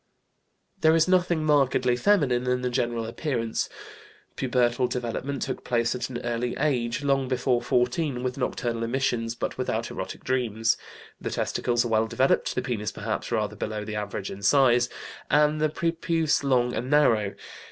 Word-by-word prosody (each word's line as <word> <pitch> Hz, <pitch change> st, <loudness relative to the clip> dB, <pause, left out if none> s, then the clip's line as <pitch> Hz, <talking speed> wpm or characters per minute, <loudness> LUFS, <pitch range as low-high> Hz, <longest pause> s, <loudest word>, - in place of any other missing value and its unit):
There 160 Hz, -2 st, +5 dB
is 165 Hz, +1 st, +4 dB
nothing 180 Hz, -3 st, +2 dB
markedly 130 Hz, -4 st, +3 dB
feminine 125 Hz, -5 st, +2 dB
in 125 Hz, 0 st, 0 dB
the 125 Hz, -, -1 dB
general 120 Hz, -1 st, -1 dB
appearance. 115 Hz, -1 st, -2 dB, 0.7 s
Pubertal 125 Hz, -1 st, +1 dB
development 125 Hz, +3 st, -3 dB
took 130 Hz, -, -4 dB
place 120 Hz, -1 st, +1 dB
at 125 Hz, -, -3 dB
an 125 Hz, -, -4 dB
early 120 Hz, +1 st, -2 dB
age, 125 Hz, -3 st, 0 dB
long 135 Hz, -1 st, +1 dB
before 125 Hz, -1 st, +1 dB
fourteen, 125 Hz, +1 st, 0 dB
with 125 Hz, 0 st, -2 dB
nocturnal 120 Hz, -3 st, -2 dB
emissions, 115 Hz, -1 st, -1 dB
but -, -, -4 dB
without -, -, -2 dB
erotic -, -, -6 dB
dreams. 115 Hz, -3 st, +1 dB, 0.5 s
The -, -, -3 dB
testicles 120 Hz, 0 st, 0 dB
are -, -, -2 dB
well 110 Hz, 0 st, +2 dB
developed, 130 Hz, +4 st, +1 dB
the -, -, -1 dB
penis 110 Hz, -5 st, -2 dB
perhaps -, -, -4 dB
rather -, -, -1 dB
below 105 Hz, -1 st, -4 dB
the 110 Hz, 0 st, -5 dB
average 105 Hz, -1 st, -4 dB
in 100 Hz, -, -8 dB
size, 120 Hz, +1 st, +4 dB, 0.4 s
and 150 Hz, +1 st, +3 dB
the 155 Hz, -, +3 dB
prepuce 165 Hz, -1 st, 0 dB
long 125 Hz, -3 st, +2 dB
and 125 Hz, +3 st, -3 dB
narrow. 115 Hz, -9 st, +3 dB
125 Hz, 160 wpm, -26 LUFS, 120-140 Hz, 0.7 s, There